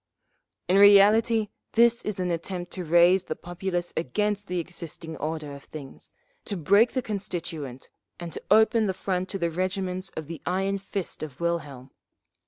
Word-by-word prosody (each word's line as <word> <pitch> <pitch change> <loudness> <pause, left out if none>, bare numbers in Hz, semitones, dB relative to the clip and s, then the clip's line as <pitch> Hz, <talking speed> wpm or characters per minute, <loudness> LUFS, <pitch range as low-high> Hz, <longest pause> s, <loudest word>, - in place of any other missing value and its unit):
'_ - - -61 0.7
"In 195 - +6
reality, 210 +2 +6 0.2
this 235 0 +4
is 210 -3 -3
an 180 -1 0
attempt 175 +1 -4
to 185 - -4
raise 175 +3 +5
the 155 - -3
populace 175 0 -4
against 205 +7 -1
the 180 - -2
existing 165 -1 -7
order 155 -2 -4
of 140 0 -11
things, 145 -4 -10 0.3
to 200 - -2
break 200 +8 +4
the 255 - -1
Constituent 170 - -5 0.3
and 170 -1 -7
to - - -5
open 220 +1 +5
the 190 - -1
front 185 -1 -2
to 195 - -3
the 170 -2 -1
regiments 185 +1 -2
of 160 - -4
the 165 +1 -8
iron 195 +2 0
fist 195 -1 -5
of 150 -4 -7
Wilhelm…. 150 -7 -3
180 Hz, 170 wpm, -26 LUFS, 165-200 Hz, 0.7 s, In